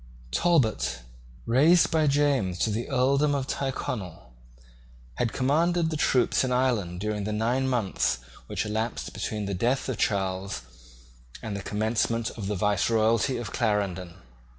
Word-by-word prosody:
Talbot, 110 Hz, -, +1 dB, 0.4 s
raised 150 Hz, +9 st, +4 dB
by 155 Hz, -2 st, +3 dB
James 140 Hz, -10 st, +2 dB
to 110 Hz, -, +1 dB
the 115 Hz, +6 st, -3 dB
earldom 140 Hz, +2 st, +2 dB
of 135 Hz, -2 st, -1 dB
Tyrconnel, 100 Hz, -, -4 dB, 0.8 s
had 115 Hz, -, 0 dB
commanded 165 Hz, +5 st, +1 dB
the -, -, -1 dB
troops 130 Hz, -4 st, +2 dB
in 130 Hz, -, -1 dB
Ireland 115 Hz, -9 st, 0 dB
during 105 Hz, 0 st, -2 dB
the 105 Hz, -, -2 dB
nine 120 Hz, +5 st, 0 dB
months 115 Hz, -, 0 dB, 0.3 s
which -, -, -2 dB
elapsed 110 Hz, +2 st, -3 dB
between 105 Hz, -1 st, -3 dB
the 100 Hz, -, -3 dB
death 120 Hz, +8 st, 0 dB
of 125 Hz, -, -3 dB
Charles 95 Hz, -, -1 dB, 0.8 s
and 110 Hz, -2 st, -4 dB
the 100 Hz, -, -4 dB
commencement 110 Hz, +2 st, -1 dB
of 105 Hz, -4 st, -6 dB
the 105 Hz, -, -1 dB
viceroyalty 110 Hz, +5 st, +2 dB
of 120 Hz, -2 st, -6 dB
Clarendon. 100 Hz, -6 st, -1 dB
115 Hz, 140 wpm, -27 LUFS, 100-130 Hz, 0.8 s, raised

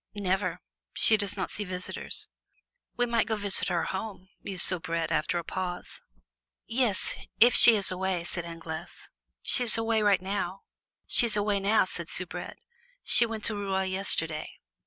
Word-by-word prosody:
"Never; 185 Hz, -3 st, -1 dB, 0.3 s
she 220 Hz, -, +7 dB
does 205 Hz, -1 st, +1 dB
not 190 Hz, -, -3 dB
see 210 Hz, -, -3 dB
visitors." 180 Hz, -1 st, -5 dB, 0.7 s
"We 245 Hz, -, +2 dB
might 235 Hz, -1 st, 0 dB
go 220 Hz, -, 0 dB
visit 200 Hz, -2 st, +1 dB
her 170 Hz, -, 0 dB
home," 190 Hz, -1 st, -6 dB
mused 190 Hz, -3 st, 0 dB
Soubrette, 165 Hz, -2 st, 0 dB
after 155 Hz, +2 st, 0 dB
a 170 Hz, -, -3 dB
pause. 180 Hz, +1 st, -6 dB, 0.6 s
"Yes, 230 Hz, -4 st, 0 dB, 0.2 s
if 240 Hz, +2 st, +7 dB
she 235 Hz, -, +8 dB
is 200 Hz, -2 st, +2 dB
away," 185 Hz, -1 st, -2 dB
said 175 Hz, 0 st, -5 dB
Anglaise. 165 Hz, -1 st, -8 dB, 0.3 s
"She's 240 Hz, -3 st, +2 dB
away 225 Hz, -1 st, +1 dB, 0.2 s
now," 195 Hz, 0 st, -4 dB, 1.2 s
said -, -, -2 dB
Soubrette; -, -, -5 dB, 0.5 s
"she 235 Hz, -, +5 dB
went 225 Hz, -1 st, -5 dB
to 215 Hz, -, -1 dB
Rouen 190 Hz, -2 st, -2 dB
yesterday." 165 Hz, -5 st, -1 dB
190 Hz, 135 wpm, -28 LUFS, 175-215 Hz, 1.2 s, she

